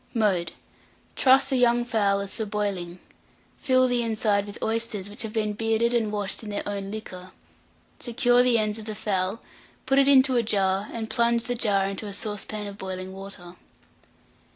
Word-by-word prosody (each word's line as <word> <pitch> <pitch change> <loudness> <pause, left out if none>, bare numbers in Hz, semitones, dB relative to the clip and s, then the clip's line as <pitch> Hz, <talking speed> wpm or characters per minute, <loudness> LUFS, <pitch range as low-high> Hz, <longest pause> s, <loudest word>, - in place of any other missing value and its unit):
Mode. 190 -7 +1 0.6
Truss 270 +1 +4
a - - +2
young 240 -1 +3
fowl 200 -4 +1
as 200 - -4
for 220 -2 -4
boiling; 200 -4 -3 0.6
fill 255 -2 +3
the 245 -1 +1
inside 215 -3 0
with 205 - -8
oysters 220 -3 -2
which 210 - -6
have 220 -1 -3
been 215 -1 -1
bearded 225 +2 +1
and 225 -3 +1
washed 205 -2 -2
in 215 - -8
their 205 - -4
own 200 -1 -4
liquor; 185 -4 -8 0.7
secure 245 0 +3
the 250 -2 +4
ends 215 0 0
of 215 - -9
the 215 -1 -5
fowl, 195 0 -1 0.4
put 270 +1 +3
it 275 - +4
into 265 -1 +5
a - - +4
jar, 195 -2 +1
and 225 -1 -5
plunge 235 0 +2
the 245 - -2
jar 205 -5 +1
into 195 +2 -4
a 200 - -6
saucepan 210 0 -4
of 200 0 -8
boiling 185 0 -6
water. 190 -2 -10
215 Hz, 180 wpm, -25 LUFS, 200-235 Hz, 0.7 s, into